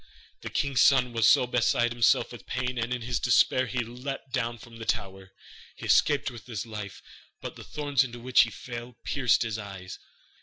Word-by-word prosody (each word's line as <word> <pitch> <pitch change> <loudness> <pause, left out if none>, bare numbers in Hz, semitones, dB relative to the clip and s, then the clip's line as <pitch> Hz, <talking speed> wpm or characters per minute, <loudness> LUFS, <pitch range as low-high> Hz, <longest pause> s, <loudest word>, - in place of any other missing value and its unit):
The - - -6
king's 140 -4 +1
son 125 -3 +4
was 115 -2 +5 0.2
beside 120 0 +2
himself 120 -1 +3
with - - -11
pain, 125 -1 -2
and 115 +1 -2
in 125 -2 -2
his 120 +1 -1
despair 130 +1 +3
he 125 0 -2
leapt 125 +2 -7
down 120 -2 -1
from 115 +1 -13
the 115 - -8
tower. 95 -4 -3 0.4
He - - -9
escaped 145 -2 +3
with 120 -1 -12
his 110 -4 -4
life, 105 -3 -8 0.4
but - - -7
the - - -10
thorns 145 -3 0
into 120 -2 -7
which 125 +2 +4
he 115 - +2
fell 120 +2 -8
pierced 125 -5 +2
his 110 -1 -3
eyes. 95 -3 -8
120 Hz, 190 wpm, -27 LUFS, 115-125 Hz, 0.4 s, was